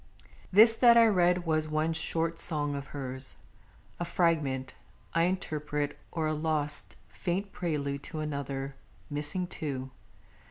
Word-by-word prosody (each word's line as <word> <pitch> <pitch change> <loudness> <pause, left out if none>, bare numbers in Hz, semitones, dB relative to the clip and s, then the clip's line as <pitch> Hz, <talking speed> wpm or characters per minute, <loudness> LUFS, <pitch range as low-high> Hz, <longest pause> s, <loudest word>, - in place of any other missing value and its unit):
This 220 +4 +7
that 235 -2 +7
I 230 - +8
read 180 -4 +3
was 155 -1 +1
one 155 +1 0
short 165 +1 0
song 145 -3 -1
of 140 -1 -5
hers, 130 -2 -2 0.6
A - - -1
fragment, 155 -7 0 0.4
I 165 0 +3
interpret, 150 -5 -2 0.2
or 160 -2 -2
a 155 - 0
lost 150 -2 +1
Faint 190 +3 -3
prelude 140 -5 -2
to 160 - -6
another 140 -2 -4 0.3
missing 150 +5 -1
too. 135 -7 -5
155 Hz, 130 wpm, -29 LUFS, 145-175 Hz, 0.6 s, I